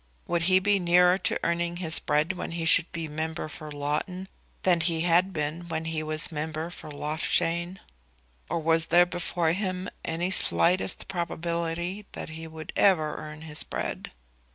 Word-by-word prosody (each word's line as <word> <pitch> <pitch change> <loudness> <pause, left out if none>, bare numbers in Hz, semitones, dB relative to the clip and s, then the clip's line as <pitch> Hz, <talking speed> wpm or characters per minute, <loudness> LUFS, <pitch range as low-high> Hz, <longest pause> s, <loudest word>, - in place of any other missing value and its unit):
Would 170 -1 0
he 185 - +6
be 200 +1 +2
nearer 180 +1 +4
to - - 0
earning 170 0 -1
his 165 -3 +3
bread 150 +4 +1
when 175 - -6
he 165 -1 -3
should 170 +1 +5
be 165 -3 -4
member 155 +1 -4
for 155 0 -9
Loughton 150 +6 -3 0.4
than 175 -3 +4
he 165 -1 0
had 175 +3 +3
been 155 +1 -3
when 160 -1 -3
he 160 -1 -2
was 155 +2 +3
member 160 +2 -4
for 155 - -10
Loughshane? 165 +4 -1 0.7
Or - - -1
was 165 +1 +3
there 175 0 +6
before 175 -2 -1
him 185 0 -3
any 170 +3 -2
slightest 180 0 +2
probability 170 +2 -3
that - - -7
he 160 +1 -8
would 160 -1 -9
ever 160 -7 +3
earn 155 +1 -9
his 155 -2 +2
bread? - - -4
170 Hz, 165 wpm, -27 LUFS, 160-180 Hz, 0.7 s, he